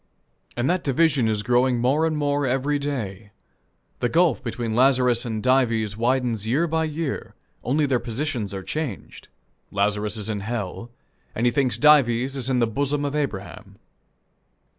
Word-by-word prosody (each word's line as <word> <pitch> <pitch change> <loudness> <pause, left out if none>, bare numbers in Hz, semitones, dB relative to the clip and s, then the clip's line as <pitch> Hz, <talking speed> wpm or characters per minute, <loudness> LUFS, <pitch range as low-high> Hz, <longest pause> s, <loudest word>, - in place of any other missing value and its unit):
And 120 +2 0
that 180 0 +1
division 140 -3 +2
is 105 -1 0
growing 125 +1 +2
more 135 +7 +2
and 155 -1 -2
more 145 -1 0
every 135 +3 0
day 110 -8 -4 0.7
The 120 - 0
gulf 165 -1 +2
between 115 -2 -3
Lazarus 125 -2 +3
and 110 -2 -3
Dives 115 -5 +2
widens 120 -2 0
year 140 +9 +2
by 160 -1 0
year, 155 -1 -4 0.3
only 145 +4 +1
their 130 -3 +1
positions 120 -2 -3
are 95 -1 -5
changed 150 -3 -5 0.4
Lazarus 105 +1 -1
is 105 - -3
in 105 -2 -2
hell, 110 +1 -5 0.5
and 115 - 0
he 120 - +4
thinks 130 +1 +1
Dives 135 -3 +4
is 130 -1 0
in 130 - +1
the 120 - +3
bosom 140 +5 -1
of 140 - -2
Abraham. 115 -10 -5
125 Hz, 160 wpm, -23 LUFS, 115-145 Hz, 0.7 s, he